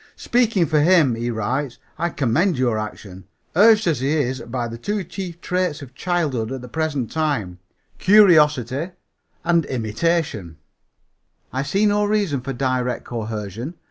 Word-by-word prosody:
"Speaking 230 -7 +1
for 155 -1 +2
him," 160 -5 +4
he 115 +1 -3
writes, 120 +4 -2 0.2
"I 170 - 0
commend 150 - +1
your 120 -4 +1
action. 100 -3 -8 0.3
Urged 215 +3 +6
as 160 -7 +1
he 135 +2 -1
is 130 -3 -1
by 120 0 -4
the 115 0 -8
two 205 - -2
chief 175 -1 -7
traits 180 -5 -1
of 130 -2 -12
childhood, 145 -8 -1
at 135 -1 -5
the 125 - -9
present 145 -3 -2
time 140 - -2 0.4
curiosity 160 - +4 0.5
and 170 -1 +2
imitation 115 - -2 1.0
I 130 - -1
see 195 +9 +1
no 205 0 +2
reason 205 -10 0
for 135 +2 -5
direct 130 -1 -1
coercion. 110 - -5
140 Hz, 145 wpm, -21 LUFS, 120-175 Hz, 1.0 s, Urged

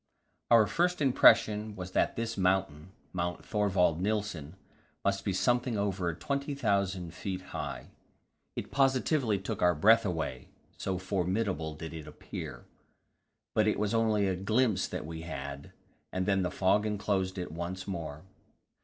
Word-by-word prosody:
Our 115 -2 +7
first 180 +8 +1
impression 110 -6 +4
was 90 -1 -6
that - - +1
this 115 0 -2
mountain 90 -3 0 0.2
Mount 90 -1 -3
Thorvald 95 -5 +2
Nilsen 100 -6 -2 0.5
must 100 0 +1
be 100 - 0
something 120 +4 +1
over 95 -3 0
20,000 100 - -1
feet 95 -2 -4
high; - - -5 0.6
it - - -5
positively 135 -4 +2
took 95 - -4
our 90 -1 +4
breath 110 +8 +6
away, 80 -9 -3 0.3
so 95 -1 -2
formidable 95 -3 -1
did 80 +1 -7
it 80 -2 -8
appear. 70 -4 -8 0.9
But 110 0 +3
it 105 - +2
was 105 0 0
only 110 -3 +2
a 95 - 0
glimpse 110 +3 +1
that - - -5
we 80 0 -6
had, 70 -3 -6 0.4
and 95 0 -1
then 95 -1 +2
the 90 - 0
fog 95 +3 +2
enclosed 100 -2 -1
it 90 - -4
once 85 +4 -5
more. 80 -5 -5
95 Hz, 145 wpm, -30 LUFS, 90-110 Hz, 0.9 s, Our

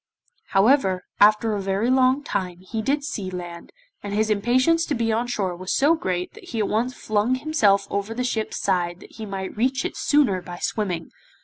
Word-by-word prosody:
However, 195 -3 +3 0.2
after 215 +1 +5
a 205 - -2
very 195 +5 0
long 260 +2 +3
time, 180 -8 -3
he 220 +4 -4
did 280 +6 0
see 215 -10 -4
land, 175 -2 -8 0.3
and 205 0 -4
his 220 +1 +1
impatience 255 +10 +3
to 295 - 0
be 230 -1 0
on 235 +2 0
shore 195 -7 -2
was 185 +1 -5
so 290 +4 +4
great 180 - -2
that 435 -2 -14
he 240 - -6
at 210 - +1
once 245 +4 -1
flung 215 +4 0
himself 230 -9 +2
over 200 +3 -2
the 250 - -1
ship's 225 -3 -2
side 175 -2 0
that - - -15
he 220 -1 -6
might 190 -1 -5
reach 260 +4 0
it - - -3
sooner 265 -11 +2
by 175 0 -8
swimming. 180 -5 -3
215 Hz, 200 wpm, -23 LUFS, 190-255 Hz, 0.3 s, after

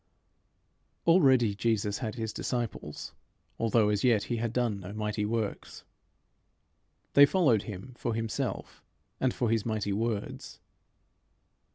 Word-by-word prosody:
Already 130 - +5
Jesus 105 -1 0
had 110 -3 -4
his 110 -2 -4
disciples, 120 -3 -4 0.5
although 115 -1 +3
as 105 -1 0
yet 115 -5 +4
he 120 - -2
had 115 0 -2
done 120 -4 0
no 95 +1 -8
mighty 105 -1 -2
works. 110 -2 -3 1.3
They 145 0 +8
followed 140 - +3
him 105 +5 -8
for 115 - -2
himself 115 -1 -3 0.4
and 130 - +2
for 120 -2 -1
his 115 -2 +1
mighty 110 -3 -1
words. 110 0 -3
115 Hz, 125 wpm, -29 LUFS, 105-120 Hz, 1.3 s, They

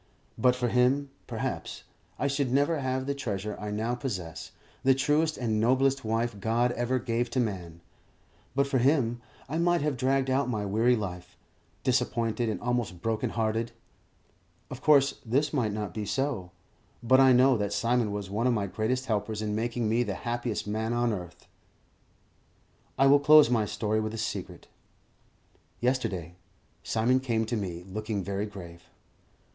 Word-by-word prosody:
But 125 +2 +3
for 125 -1 -1
him, 130 +4 +2 0.2
perhaps, - - -4 0.3
I - - -2
should 140 -2 0
never 145 +4 +2
have 130 -1 -2
the 140 - -1
treasure 105 -6 -4
I 105 - -5
now 110 +3 -1
possess, 100 - -5 0.3
the 135 0 +5
truest 155 +3 +1
and 110 -4 0
noblest 130 +4 +2
wife 115 -1 -1
God 115 +4 +1
ever 120 +1 0
gave 120 0 -1
to 130 - -1
man; 90 -8 -3 0.7
but 140 0 +3
for 140 -2 0
him, 120 -3 +2 0.3
I 155 +5 -2
might 175 -1 +2
have 150 -3 -1
dragged 135 +1 +1
out 135 0 +1
my 105 -4 -2
weary 115 +5 +3
life, 90 -5 -6 0.5
disappointed 120 -2 0
and 110 - -2
almost 120 -7 -2
broken 115 -1 0
hearted. 115 +1 -1 1.0
Of - - -7
course 140 -2 +4
this 140 +6 0
might 120 -7 +1
not 105 -4 -4
be 105 0 -4
so; 125 -7 -2 0.5
but 130 +3 +5
I 135 -1 +7
know 130 +1 +5
that 105 -1 -2
Simon 115 +1 +1
was 100 -1 -4
one 110 +6 0
of 125 - +3
my 100 -2 0
greatest 110 +6 -1
helpers 105 -2 -2
in 105 -1 -2
making 115 +1 -1
me 115 +3 +2
the 105 -5 -2
happiest 120 -2 -2
man 110 +2 -2
on 120 -1 +1
earth. 90 -2 -8 1.5
I 135 - +4
will 140 +1 +7
close 150 -3 +7
my 115 -3 +2
story 110 +1 -1
with 110 +1 -3
a - - -6
secret. 110 - -5 1.1
Yesterday, 100 -10 -1 0.5
Simon 120 +4 +2
came 115 -4 0
to 120 +2 -2
me, 90 -5 -4
looking 105 0 -3
very 100 +2 -2
grave. 85 -4 -11
120 Hz, 165 wpm, -28 LUFS, 105-130 Hz, 1.5 s, I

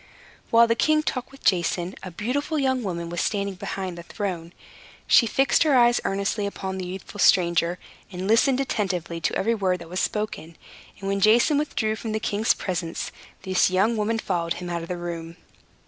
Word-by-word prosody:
While 230 0 +6
the 230 - +2
king 305 +6 +2
talked 255 -4 -3
with 275 - -16
Jason, 175 0 +1
a 185 - -7
beautiful 270 - -2
young 260 -3 +1
woman 170 -5 -4
was 175 - -2
standing 200 -1 -1
behind 185 0 -5
the 170 - -8
throne. 175 -2 -5 0.5
She 230 - +5
fixed 270 +5 +2
her 305 -4 +4
eyes 240 0 +4
earnestly 200 +1 -1
upon 190 -1 -5
the 180 - -4
youthful 190 +3 -8
stranger, 170 -2 +3 0.3
and 185 +1 -4
listened 250 +4 +4
attentively 185 -10 -2
to - - 0
every 230 +4 +1
word 190 -4 0
that 170 -2 -11
was 180 +1 -3
spoken; 200 -7 -3 0.4
and 195 - -6
when 200 0 0
Jason 235 +9 +4
withdrew 220 -7 -1
from 220 0 -5
the 220 - 0
king's 215 0 +1
presence, 170 -3 -3 0.3
this 185 -1 +2
young 195 +5 +2
woman 220 +1 0
followed 175 -6 -1
him 175 -1 -6
out 170 -1 -2
of 165 - -7
the 180 - -4
room. 170 -1 -6
195 Hz, 190 wpm, -24 LUFS, 175-230 Hz, 0.5 s, While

